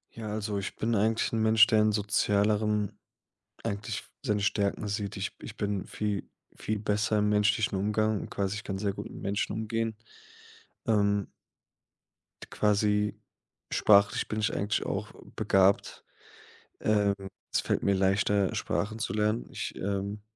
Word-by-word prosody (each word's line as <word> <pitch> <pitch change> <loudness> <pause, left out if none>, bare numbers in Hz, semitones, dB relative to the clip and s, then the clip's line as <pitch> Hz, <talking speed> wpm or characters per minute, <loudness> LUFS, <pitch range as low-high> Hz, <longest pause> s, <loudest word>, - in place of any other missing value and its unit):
Ja, 115 -1 -6
also 105 -1 -2
ich 100 - -5
bin 115 +1 -1
eigentlich 110 +1 +2
'n 115 - +1
Mensch, 110 0 +7
der 110 -2 +3
in 105 0 +4
Sozialerem 105 0 +1 0.7
eigentlich 100 +1 -3 0.2
seine 105 -1 0
Stärken 100 +1 0
sieht. 100 0 -3
Ich 95 +1 -3
ich 110 - -9
bin 100 -2 -1
vie 105 -2 -3 0.3
viel 110 - -2
besser 105 +1 +1
im 105 0 +2
menschlichen 105 +1 +2
Umgang 105 +1 +1
und - - -7
quasi 100 +1 -2
ich 105 - -7
kann 95 - -4
sehr 100 0 -1
gut - - -6
mit - - -9
Menschen 100 +1 -1
umgehen. 110 +1 -2 0.9
Ähm 100 -2 +2 1.2
d - - -13
quasi 105 0 +2 0.6
sprachlich 100 0 +4
bin 110 - -2
ich 105 - +1
eigentlich 100 +1 -1
auch - - -3 0.2
begabt. 95 +1 +2 0.8
Ähm, 105 -2 +2 0.4
es - - +3
fällt - - -1
mir 100 - +3
leichter, 95 +1 +2
Sprachen 110 +2 -2
zu - - -2
lernen. 105 +1 0
Ich, - - -5
ähm 100 +1 -3
105 Hz, 150 wpm, -29 LUFS, 100-110 Hz, 1.2 s, Mensch